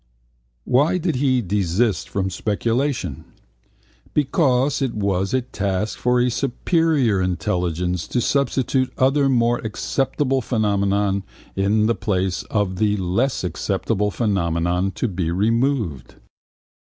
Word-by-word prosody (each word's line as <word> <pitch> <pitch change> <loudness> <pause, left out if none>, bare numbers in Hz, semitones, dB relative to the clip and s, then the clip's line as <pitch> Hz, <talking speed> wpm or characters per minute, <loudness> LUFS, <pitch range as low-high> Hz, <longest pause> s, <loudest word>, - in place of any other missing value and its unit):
Why 145 +8 +3
did 165 -5 -1
he 130 -2 +2
desist 100 +1 0
from 95 -1 -2
speculation? 115 - -1 0.9
Because 140 -3 +2
it 130 -4 -1
was 100 -2 0
a 130 -1 +1
task 100 -3 -2
for 125 0 +2
a 125 0 +2
superior 140 - +1
intelligence 90 -1 -1
to 125 - -1
substitute 130 0 +1
other 135 +1 +3
more 120 -2 +2
acceptable 135 +4 -1
phenomena 100 -3 +1 0.3
in 105 +2 +2
the 115 - +3
place 95 -4 -1
of 100 -3 0
the 105 +1 +1
less 100 +8 0
acceptable 100 +4 -1
phenomena 90 -3 0
to - - -1
be 90 -5 -2
removed. 110 - 0
105 Hz, 115 wpm, -21 LUFS, 95-130 Hz, 0.9 s, Why